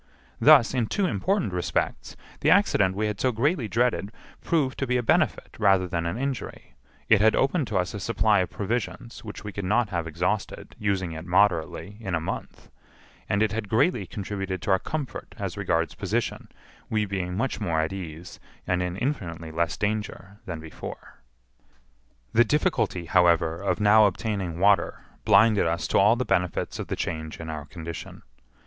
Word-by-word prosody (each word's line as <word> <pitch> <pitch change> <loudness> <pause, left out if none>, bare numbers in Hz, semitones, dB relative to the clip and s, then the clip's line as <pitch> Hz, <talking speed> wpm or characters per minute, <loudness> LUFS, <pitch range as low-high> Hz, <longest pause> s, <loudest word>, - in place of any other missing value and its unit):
Thus, 140 -6 +6
in 120 -4 0
two 200 - 0
important 175 - 0
respects, 90 -1 -2 0.2
the - - +2
accident 130 - +4
we 105 +2 0
had 105 -2 -3
so 130 - +2
greatly 125 +2 0
dreaded 110 -4 0 0.3
proved 145 -6 0
to 135 - -1
be 125 0 +2
a 125 - -1
benefit - - +1
rather 95 -3 +4
than 85 -1 -2
an 85 - -3
injury; 135 -1 -5 0.3
it 110 -2 +5
had 110 +1 +5
opened 135 +1 +1
to 105 - -1
us 90 0 -1
a 105 - -5
supply 105 +1 +2
of 90 - 0
provisions 120 +2 -4
which 105 -2 -8
we 105 - -5
could 100 - -5
not 110 +4 +1
have 85 -3 -2
exhausted, 90 +6 -3
using 95 -4 -1
it 80 0 -6
moderately, 95 +1 +1
in 95 -6 -2
a - - 0
month; 80 - -6 0.6
and 105 +1 +2
it 110 - +1
had 105 -1 -4
greatly 115 - +2
contributed 95 -1 -4
to 105 - 0
our 95 - +4
comfort 150 +5 -5
as - - -4
regards - - 0
position, - - -2 0.4
we 110 -1 +1
being 95 -2 -3
much 135 +4 -2
more 80 -2 0
at 80 +4 -1
ease, 85 -2 -8 0.3
and 90 0 0
in 90 0 -3
infinitely 85 - -3
less 85 +1 -1
danger, 105 -1 -3
than 85 -3 -4
before. 80 -1 -9 1.1
The 120 - +6
difficulty, 150 - 0
however, 85 -1 +3
of 100 +4 -1
now 105 +1 +6
obtaining 100 -4 -3
water 100 +2 +2 0.2
blinded 105 -2 +5
us 85 -1 -1
to - - +3
all 105 +4 +5
the 125 +1 -2
benefits 90 0 -1
of - - -4
the - - -2
change 80 -1 -4
in 80 -1 -5
our 75 -2 -6
condition. 85 +2 -8
100 Hz, 180 wpm, -26 LUFS, 90-115 Hz, 1.1 s, Thus